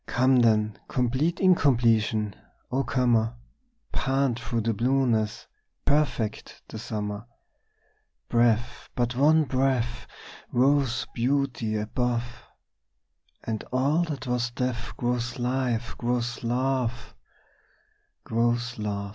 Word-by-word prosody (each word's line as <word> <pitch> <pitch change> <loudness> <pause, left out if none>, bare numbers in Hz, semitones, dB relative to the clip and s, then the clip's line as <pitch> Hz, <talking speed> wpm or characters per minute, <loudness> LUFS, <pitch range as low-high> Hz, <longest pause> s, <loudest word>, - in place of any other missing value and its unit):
Come 130 +1 +3
then, 110 -3 +3
complete 130 +7 0
incompletion, 115 - +3 0.4
O 135 +2 +1
comer, 120 -2 +1 0.6
Pant 135 -3 0
through 115 0 -2
the 115 +1 0
blueness, 115 -2 +1 0.4
perfect 140 -7 0
the 110 - -7
summer! 105 -1 -4 1.0
Breathe 115 -2 +4 0.4
but 120 0 0
one 155 +4 +5
breath 130 -3 0 0.4
Rose 135 0 +2
beauty 120 -3 0
above, 120 +3 -1 1.2
And 110 -2 -3
all 140 +6 +2
that 145 -4 -5
was 125 -1 0
death 125 -1 -3
Grows 120 0 -1
life, 125 -2 -1
grows 120 0 -1
love, 125 0 -1 1.1
Grows 120 0 0
love! 100 -1 -3
120 Hz, 95 wpm, -26 LUFS, 115-130 Hz, 1.2 s, one